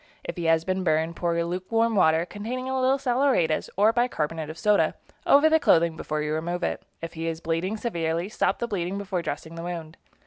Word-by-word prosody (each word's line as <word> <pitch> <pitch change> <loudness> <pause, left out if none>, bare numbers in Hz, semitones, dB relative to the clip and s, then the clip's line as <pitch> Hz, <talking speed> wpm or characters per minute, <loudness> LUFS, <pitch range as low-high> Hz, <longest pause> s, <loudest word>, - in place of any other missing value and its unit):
If - - -5
he 170 -2 -4
has 165 0 +3
been 185 0 -1
burned, 160 0 +1
pour 170 -1 -1
lukewarm 185 +7 0
water, 160 -3 +4
containing 235 +7 -5
a 265 0 -1
little 260 +1 +3
saleratus 250 - +1
or 215 +3 +5
bicarbonate 165 -10 -1
of 160 - -7
soda, 210 +3 +2 0.3
over 285 +3 +6
the 320 0 +4
clothing 170 - +3
before 155 -1 -3
you 150 0 -2
remove 170 +3 -2
it. - - -1 0.2
If 165 - -5
he 165 0 -4
is 165 -1 -3
bleeding 170 +6 -2
severely, 170 -6 -2
stop 215 - 0
the 235 - -2
bleeding 190 -2 -2
before 195 -3 -2
dressing 160 0 -5
the 165 - -7
wound. 165 -2 -6
175 Hz, 205 wpm, -26 LUFS, 165-220 Hz, 0.3 s, over